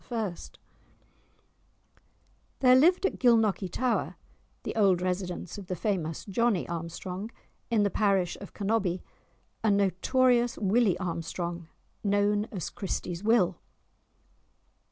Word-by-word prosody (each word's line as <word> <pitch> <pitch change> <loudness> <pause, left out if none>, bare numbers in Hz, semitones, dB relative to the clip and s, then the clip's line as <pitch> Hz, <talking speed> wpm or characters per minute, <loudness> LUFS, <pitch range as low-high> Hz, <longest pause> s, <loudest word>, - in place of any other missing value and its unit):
There 230 +4 -5
lived 350 +8 +4
at - - -1
Gilnockie 225 -6 +3
tower 245 +6 -1 0.5
(the - - -4
old 195 -5 +4
residence 180 0 -3
of 195 - -10
the 185 - -2
famous 175 -6 -2
Johnie 215 -1 +1
Armstrong) 175 +4 -5 0.4
in 220 -3 +3
the 200 - +1
parish 195 -4 +1
of 200 - -9
Cannobie, 200 -4 -1 0.6
a 220 - +3
notorious 235 +5 +2
Willie 205 -2 +2
Armstrong, 170 -1 -4 0.4
known 205 0 +2
as 190 -7 -6
Christie's 180 -2 -4
Will. 210 -5 +3
200 Hz, 105 wpm, -28 LUFS, 180-225 Hz, 0.6 s, lived